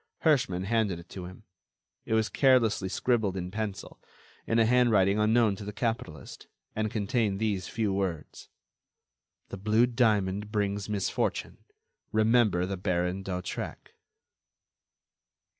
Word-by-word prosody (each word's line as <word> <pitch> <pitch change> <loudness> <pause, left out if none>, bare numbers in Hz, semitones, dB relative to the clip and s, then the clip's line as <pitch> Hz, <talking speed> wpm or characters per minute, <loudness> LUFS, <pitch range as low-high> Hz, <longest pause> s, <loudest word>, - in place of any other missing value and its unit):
Herschmann 125 - +2
handed 105 -3 0
it 85 +1 -13
to 90 -2 -7
him. 95 +4 -11 0.6
It 110 - 0
was 110 -1 +2
carelessly 115 -8 +3
scribbled 110 -3 0
in 90 0 -4
pencil, 105 -1 -5 0.5
in 115 - +1
a 115 - +5
handwriting 110 -5 +3
unknown 110 -1 +3
to 105 - -8
the 105 - -5
capitalist, 110 - -4 0.3
and 110 0 -1
contained 105 -1 0
these 105 -4 -1
few 110 -3 -1
words: 95 -6 -4 1.0
_"The - - -6
blue 110 +4 +3
diamond 105 -4 +1
brings 105 -1 -1
misfortune. 100 -2 -2 0.5
Remember 110 -5 +3
the 95 +1 -4
Baron 90 0 -1
d'Hautrec." 90 -2 -5
105 Hz, 125 wpm, -28 LUFS, 95-115 Hz, 1.0 s, a